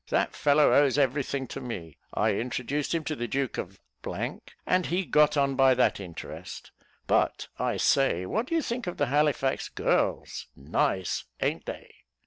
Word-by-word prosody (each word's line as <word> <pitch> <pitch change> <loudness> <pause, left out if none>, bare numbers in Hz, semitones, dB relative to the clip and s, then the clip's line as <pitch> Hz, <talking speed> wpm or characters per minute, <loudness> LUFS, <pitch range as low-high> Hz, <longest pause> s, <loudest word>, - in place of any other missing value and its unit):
That - - +1
fellow 145 +1 +4
owes 145 -1 +4
every 140 0 +2
thing 135 0 -3
to - - -6
me. 90 - -6 0.2
I 110 +1 +2
introduced 125 +7 -2
him 165 - -1
to 155 - -3
the 120 -3 -3
duke 135 +1 -2
of, 95 +2 -6 0.9
and 185 -1 +2
he 180 +2 0
got 150 -1 +4
on 140 -1 +2
by 135 -1 +5
that 125 - +2
interest; 90 -4 -8 0.3
but, - - +1
I - - 0
say, 135 -11 +2
what 225 - -1
do 330 - -1
you 325 - +2
think 235 -3 -3
of 175 - -4
the 145 - +2
Halifax 145 -3 +1
girls? - - -1
nice! 85 +6 -1
a'n't - - -1
they?" - - -7
135 Hz, 170 wpm, -28 LUFS, 120-150 Hz, 0.9 s, by